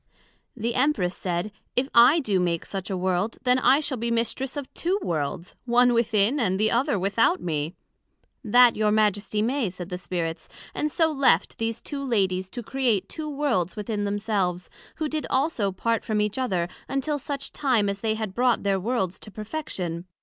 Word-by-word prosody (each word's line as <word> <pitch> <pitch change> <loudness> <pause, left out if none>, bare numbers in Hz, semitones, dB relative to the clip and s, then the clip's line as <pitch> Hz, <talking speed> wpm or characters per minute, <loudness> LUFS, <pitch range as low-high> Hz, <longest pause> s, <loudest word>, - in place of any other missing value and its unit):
The 230 +1 -1
Empress 245 -10 +1
said, 180 +3 -2 0.2
If 255 +2 +2
I 245 +8 +7
do 205 -8 +1
make 170 -2 0
such 195 0 -5
a 190 - -2
world, 185 +4 -1
then 250 0 +3
I 270 +3 +4
shall 265 -5 -2
be 235 +1 -1
Mistress 235 +4 -1
of 280 -2 -6
two 365 +4 0
Worlds, 165 +2 -3
one 245 0 +4
within, 230 +2 +2
and 190 -6 +1
the 220 +1 +2
other 255 0 +2
without 215 - +2
me. 155 0 -3 0.7
That 245 +1 +6
your 215 -1 +2
Majesty 210 0 +1
may, 245 -2 0
said 180 0 -8
the 180 -1 -4
Spirits; 165 -3 -4 0.2
and 300 0 -1
so 320 +1 +2
left 270 - +2
these 225 0 -2
two 280 -2 -5
Ladies 190 -7 0
to 240 +4 -6
create 240 -5 0
two 310 -1 -5
Worlds 275 - 0
within 210 0 -3
themselves: 200 -4 -1 0.2
who 315 - -2
did 305 0 -3
also 260 -8 +1
part 230 +4 -1
from 215 -1 -1
each 210 +4 0
other, 185 -9 0 0.2
until 280 +2 -1
such 275 0 -4
time 250 -8 +1
as 200 0 -3
they 220 -1 0
had 215 -3 -4
brought 245 +2 +2
their 195 -1 +1
Worlds 190 -3 -1
to - - -10
perfection. 195 - -5
220 Hz, 185 wpm, -25 LUFS, 190-255 Hz, 0.7 s, I